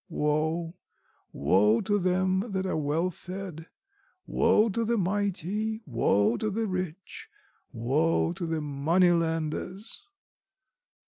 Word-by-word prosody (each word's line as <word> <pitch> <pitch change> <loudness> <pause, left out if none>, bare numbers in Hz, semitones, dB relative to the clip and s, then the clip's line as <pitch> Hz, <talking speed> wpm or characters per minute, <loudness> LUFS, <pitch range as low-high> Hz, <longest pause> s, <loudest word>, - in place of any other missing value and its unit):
Woe, 160 +3 -1 0.6
woe 100 +10 +3
to 205 -1 +1
them 185 +1 +1
that 190 0 -1
are 185 - -1
well 160 +4 0
fed, 180 -2 -8 0.6
woe 225 -1 +3
to 230 +3 -1
the 230 +1 +1
mighty, 205 +3 -1
woe 115 -4 +2
to 215 - -1
the 220 +2 -1
rich, 185 -2 -5 0.4
woe 145 +8 +1
to 175 -1 -4
the 160 -1 -1
moneylenders! 165 - 0
175 Hz, 110 wpm, -28 LUFS, 155-195 Hz, 0.6 s, woe